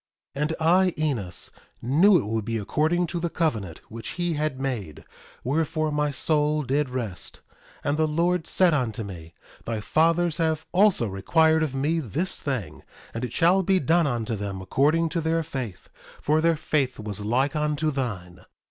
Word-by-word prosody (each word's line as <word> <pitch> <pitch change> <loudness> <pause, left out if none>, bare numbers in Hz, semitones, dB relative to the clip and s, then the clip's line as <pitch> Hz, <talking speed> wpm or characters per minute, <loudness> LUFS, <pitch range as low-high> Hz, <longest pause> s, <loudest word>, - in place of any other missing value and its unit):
1:17 140 - -3
And 155 +2 0
I, 180 +3 +4
Enos, 120 - -2 0.3
knew 170 - +5
it 155 - -1
would 110 +1 -2
be 115 +1 -2
according 155 - +1
to 170 +1 -4
the 170 0 -1
covenant 110 - -2
which 115 +1 -6
he 175 -1 0
had 150 -3 -2
made; 115 - -4 0.4
wherefore 155 +3 0
my 150 0 +1
soul 150 +2 +1
did 140 +2 0
rest. 115 -8 -5 0.4
1:18 - - +1
And 145 - +1
the 155 - +3
Lord 170 +2 0
said 180 -3 +3
unto 120 -5 -1
me: 85 -5 -9 0.3
Thy 115 -2 -2
fathers 165 +8 +2
have 160 -2 0
also 190 - +4
required 160 - +2
of 150 -4 -1
me 150 +5 +1
this 160 - -3
thing; 110 - -4 0.3
and 115 - -4
it 125 - -3
shall 175 +8 +4
be 190 0 +2
done 165 +3 +3
unto 115 -3 -2
them 100 -2 -4
according 150 - +2
to 165 +1 -1
their 165 +1 0
faith; 130 - -6 0.3
for 155 +2 +2
their 165 -1 +3
faith 145 -5 -1
was 105 -2 -5
like 125 +7 0
unto 150 0 0
thine. 95 -10 -4
150 Hz, 175 wpm, -25 LUFS, 115-165 Hz, 0.4 s, knew